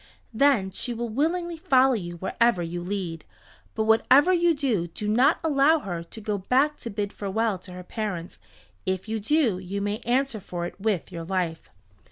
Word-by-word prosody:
Then 220 -6 +3
she 240 +5 -3
will 235 +1 -3
willingly 335 +7 -1
follow 270 -6 +4
you 175 -6 -4
wherever 190 +1 +1
you 175 +1 -4
lead. 175 -3 -4 0.5
But 220 - +1
whatever 260 +10 +5
you 345 -2 +3
do 240 -12 0
do 205 +5 -6
not 235 +5 +4
allow 305 0 +4
her 180 - -4
to 170 +6 -11
go 210 -1 -2
back 270 +9 +2
to 235 - -6
bid 205 -1 -3
farewell 205 0 -1
to 180 0 -11
her 180 0 -8
parents. 180 -4 -5 0.5
If 190 +2 -1
you 220 0 -2
do 230 - +2
you 190 +2 -4
may 205 +2 -2
answer 250 -1 0
for 175 -2 -5
it 185 - -8
with 200 -5 -1
your 170 -2 -6
life." 175 -3 -2
215 Hz, 185 wpm, -26 LUFS, 185-265 Hz, 0.5 s, whatever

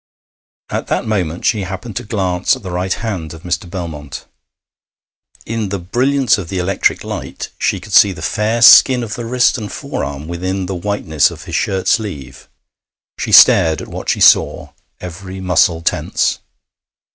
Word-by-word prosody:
At - - -3
that - - -1
moment 90 -6 -2
she 110 -3 +1
happened 95 +4 -7
to - - -4
glance 95 -2 0
at 130 - -13
the 95 - -6
right 90 +2 -3
hand 95 -8 -4
of 80 - -14
Mr. 90 0 -3
Belmont. 80 -6 -7 1.2
In 110 -3 -3
the 100 - -2
brilliance 125 +7 +1
of 85 -4 -7
the 95 - -4
electric 90 +1 0
light - - -6
she - - 0
could - - -11
see 100 - +6
the 80 -3 -9
fair 110 +6 0
skin 125 +1 +7
of 110 -1 -5
the 120 - -6
wrist 125 +1 +2
and 105 -2 -7
forearm 70 +2 -5
within 95 +2 -3
the 95 - -4
whiteness 85 -6 0
of 80 -3 -11
his 85 - -10
shirt 95 -2 -1
sleeve. 95 - -3 0.7
She - - -3
stared 80 -1 +6
at - - -9
what - - -6
she - - 0
saw, - - +4 0.3
every 95 +2 -8
muscle 90 -2 +1
tense. - - 0
95 Hz, 170 wpm, -16 LUFS, 85-105 Hz, 1.2 s, skin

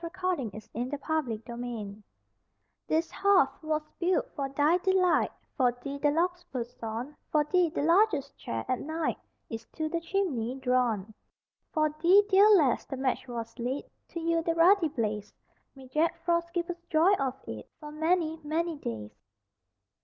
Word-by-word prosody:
DEDICATION 355 - -2
FOR 230 +6 -5
A - - -6
FIREPLACE 235 -7 -3 0.9
This 320 +1 +1
hearth 375 -9 +3
was 310 -1 -1 0.2
built 355 +1 +1
for 275 -1 -2
thy 295 +6 +3
delight, 370 -1 +3 0.2
For 250 -3 +3
thee 275 +3 -7
the 295 - +3
logs 350 +4 0
were 250 -3 -1
sawn, 235 +3 -6 0.2
For 300 -1 +4
thee 350 +3 +2
the 310 - -2
largest 335 -4 +3
chair, 115 -1 -4
at 255 - 0
night, 315 +2 -2 0.3
Is 225 0 -6
to 315 -1 -2
the 335 +1 -2
chimney 325 - -1
drawn. 250 -6 0 0.6
For 310 -1 +2
thee, 380 +4 +7
dear 400 +2 +7
lass, 310 - +4
the 270 - -5
match 265 0 -1
was 230 -1 -6
lit 250 +4 -3 0.2
To 340 - -6
yield 330 0 0
the 330 - +1
ruddy 345 +1 +5
blaze 215 -6 -3 0.4
May 265 -1 -12
Jack 310 +7 +1
Frost 340 0 +1
give 345 0 -1
us 345 0 -9
joy 330 +5 +5
of 265 -1 -1
it - - -7
For 300 -1 -8
many, 320 +1 0
many 320 +2 -1
days. 110 - -5
305 Hz, 160 wpm, -29 LUFS, 250-340 Hz, 0.9 s, thee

